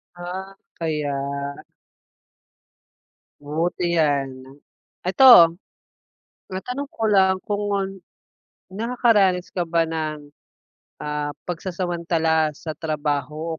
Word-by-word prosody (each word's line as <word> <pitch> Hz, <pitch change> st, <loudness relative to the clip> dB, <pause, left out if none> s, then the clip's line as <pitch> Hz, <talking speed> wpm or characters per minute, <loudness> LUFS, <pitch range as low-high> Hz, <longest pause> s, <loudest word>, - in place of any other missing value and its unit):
Ah, 185 Hz, +2 st, -7 dB, 0.2 s
kaya. 155 Hz, -3 st, -2 dB, 2.3 s
Buti 170 Hz, +4 st, -1 dB
'yan. 140 Hz, -4 st, 0 dB, 0.6 s
Ito, 185 Hz, -6 st, +8 dB, 1.0 s
matanong 250 Hz, +9 st, -5 dB
ko 225 Hz, -, -2 dB
lang 190 Hz, -3 st, +4 dB
kung, 205 Hz, 0 st, -1 dB, 1.1 s
nakakaranas 205 Hz, -6 st, +2 dB
ka 175 Hz, -2 st, -2 dB
ba 165 Hz, 0 st, +2 dB
ng, 155 Hz, -2 st, -4 dB, 0.7 s
ah, 150 Hz, 0 st, -3 dB
pagsasamantala 170 Hz, -3 st, -1 dB
sa 155 Hz, -, -7 dB
trabaho 155 Hz, +1 st, -3 dB
170 Hz, 75 wpm, -23 LUFS, 155-190 Hz, 2.3 s, Ito